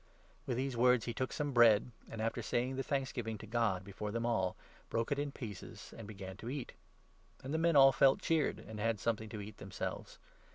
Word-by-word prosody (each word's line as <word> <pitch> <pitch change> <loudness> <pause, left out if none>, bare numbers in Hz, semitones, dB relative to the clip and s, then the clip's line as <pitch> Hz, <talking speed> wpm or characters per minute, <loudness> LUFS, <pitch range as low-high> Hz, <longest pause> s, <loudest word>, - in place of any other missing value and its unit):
With 125 -3 -1
these 130 0 -1
words 125 0 +4
he 120 - -2
took 130 +2 -2
some 145 -1 -2
bread, 120 -2 +6 0.2
and, 110 -1 -4
after 115 - -1
saying 120 +2 0
the 135 - -1
35 - - -9
thanksgiving 130 -5 -1
to 110 - -9
God 110 -4 0
before 100 +2 -5
them 115 +2 -2
all, 95 -6 +1 0.3
broke 115 +5 -1
it 145 - +1
in 145 -1 -1
pieces, 105 -9 -8
and 115 - -8
began 95 -2 -8
to 115 - -6
eat; 135 -2 -4 0.7
and 135 +3 -4
the 160 - +1
men 165 -1 +3
all 135 -1 +9
felt 135 0 +5
cheered 160 -3 +1
and 110 0 -9
had 115 0 0
something 110 -1 -1
to 110 - -6
36 105 -1 -6
eat 105 - -11
themselves. 95 -1 -5
115 Hz, 220 wpm, -35 LUFS, 105-135 Hz, 0.7 s, all